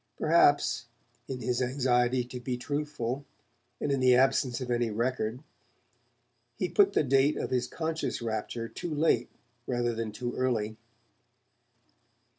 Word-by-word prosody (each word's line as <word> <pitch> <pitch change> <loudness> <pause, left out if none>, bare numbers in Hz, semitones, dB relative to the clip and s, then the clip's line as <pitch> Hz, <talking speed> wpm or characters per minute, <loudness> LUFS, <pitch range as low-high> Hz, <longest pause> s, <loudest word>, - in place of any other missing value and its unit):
Perhaps, - - +3 0.4
in 130 -2 -5
his 125 0 0
anxiety 125 -1 +2
to 125 +1 -8
be 125 0 -3
truthful, 145 -1 -3 0.6
and 145 - -1
in 135 - +1
the 130 -1 +5
absence 130 -1 +2
of 125 -2 -4
any 120 -1 +1
record, 115 +2 -2 1.1
he 185 - 0
put 200 -1 +4
the - - +3
date 135 +2 +3
of - - -3
this 125 -1 +1
conscious 160 +2 -3
rapture 115 0 -3
too 170 - -6
late 145 -6 +2 0.4
rather 120 -1 0
than 115 -1 -3
too 120 +3 -4
early. 115 -4 0
125 Hz, 135 wpm, -29 LUFS, 120-135 Hz, 1.1 s, the